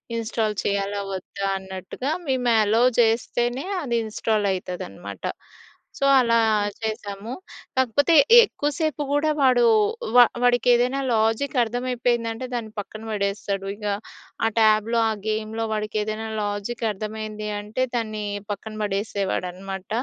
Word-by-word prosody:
Install 225 -1 -1
చేయాలా? 200 0 -1
వద్దా? 190 +1 -5
అన్నట్టుగా 190 +8 -5 0.2
మేము 255 -2 +1
అలో 220 +3 +3 0.2
చేస్తేనే 240 +3 +1 0.2
అది 240 -6 -1
ఇన్‌స్టాల్ 215 -1 0
అయితదనమాట. 100 - -7 0.7
సో, 275 - 0
అలా 230 -2 +3 0.4
చేశాము. 215 -1 -4 0.5
కాకపోతే 260 +6 +3 0.3
ఎక్కువసేపు 295 - -2
గూడా 290 +2 +2
వాడు 255 -3 +5 0.5
వ - - +7 0.3
వాడికి 245 -1 +3
ఏదైనా 250 +3 +2
లాజిక్ 225 +6 +1
అర్థమైపోయిందంటే 240 0 -1
దాన్ని 230 -3 -3
పక్కన 215 +2 -7
పడేస్తాడు. 200 -1 -2
ఇగ 210 0 -9 0.6
ఆ - - +4
ట్యాబ్‌లో 220 +1 +4
ఆ - - 0 0.2
గేమ్‌లో 220 +1 -2
వాడికి 215 0 -2
ఏదైనా 215 +1 -4 0.2
లాజిక్ 205 +3 -4
అర్థమైంది 215 +1 -5
అంటే 215 +5 -2
దాన్ని 215 -2 -2 0.3
పక్కన 215 +1 -6
పడేసేవాడు. 200 -2 -1
అనమాట. 190 +1 -8
220 Hz, 115 wpm, -24 LUFS, 205-240 Hz, 0.7 s, వ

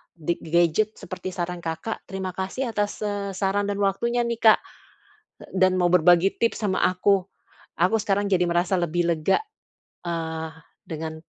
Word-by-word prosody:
di 170 0 -1
gadget 170 +6 +2
seperti 185 -1 -6
saran 175 0 -3
Kakak. 165 +7 -4
Terima 190 -1 -4
kasih 210 +7 -3
atas, 205 0 -2
eee, 200 -2 -3
saran 200 +1 0
dan 200 - -2
waktunya 235 +5 +1
nih, 235 -1 -2
Kak, 220 -1 +7 0.8
d - - -13
dan 185 0 +4
mau 175 -1 +2
berbagi 180 +2 +5
tips 230 -1 0
sama 190 -2 +1
aku. 185 +1 +2 0.5
Aku 185 +6 +4
sekarang 205 -1 0
jadi 180 -2 +3
merasa 175 +2 +1
lebih 175 0 0
lega, 165 +3 +2 0.7
eee, 160 -1 -3 0.4
dengan 160 0 -5
185 Hz, 155 wpm, -24 LUFS, 170-205 Hz, 0.8 s, Kak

